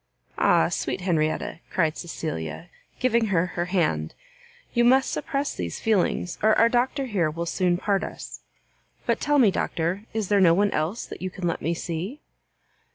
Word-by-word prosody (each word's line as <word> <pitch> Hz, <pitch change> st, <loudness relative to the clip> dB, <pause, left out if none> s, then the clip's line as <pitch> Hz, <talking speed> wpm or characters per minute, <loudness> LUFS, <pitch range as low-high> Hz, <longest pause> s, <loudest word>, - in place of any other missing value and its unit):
"Ah, -, -, +4 dB
sweet -, -, -2 dB
Henrietta!" 160 Hz, -3 st, 0 dB
cried 160 Hz, -4 st, +1 dB
Cecilia, 160 Hz, -, -5 dB, 0.3 s
giving 235 Hz, -2 st, +2 dB
her 180 Hz, -4 st, +2 dB
her 175 Hz, -, -1 dB
hand, 160 Hz, -, 0 dB, 0.6 s
"you 240 Hz, -, +3 dB
must 260 Hz, +2 st, +4 dB
suppress 285 Hz, -1 st, -2 dB
these 85 Hz, -2 st, -4 dB
feelings, 190 Hz, -4 st, 0 dB
or 215 Hz, 0 st, +4 dB
our 230 Hz, -, +5 dB
Doctor 255 Hz, +3 st, +1 dB
here 195 Hz, -10 st, 0 dB
will 165 Hz, +2 st, -4 dB
soon 175 Hz, 0 st, +1 dB
part 195 Hz, +1 st, 0 dB
us. -, -, -7 dB, 0.7 s
But -, -, +1 dB
tell 295 Hz, 0 st, +2 dB
me, 230 Hz, -8 st, +6 dB
Doctor, 180 Hz, +4 st, -2 dB
is 220 Hz, -3 st, -2 dB
there 205 Hz, -1 st, +4 dB
no 170 Hz, -2 st, +6 dB
one 205 Hz, +2 st, +2 dB
else 165 Hz, +9 st, -1 dB
that -, -, -9 dB
you 185 Hz, -, -2 dB
can 185 Hz, 0 st, -6 dB
let 170 Hz, -, -2 dB
me 170 Hz, +2 st, 0 dB
see?" 175 Hz, -, -4 dB
185 Hz, 170 wpm, -25 LUFS, 165-225 Hz, 0.7 s, me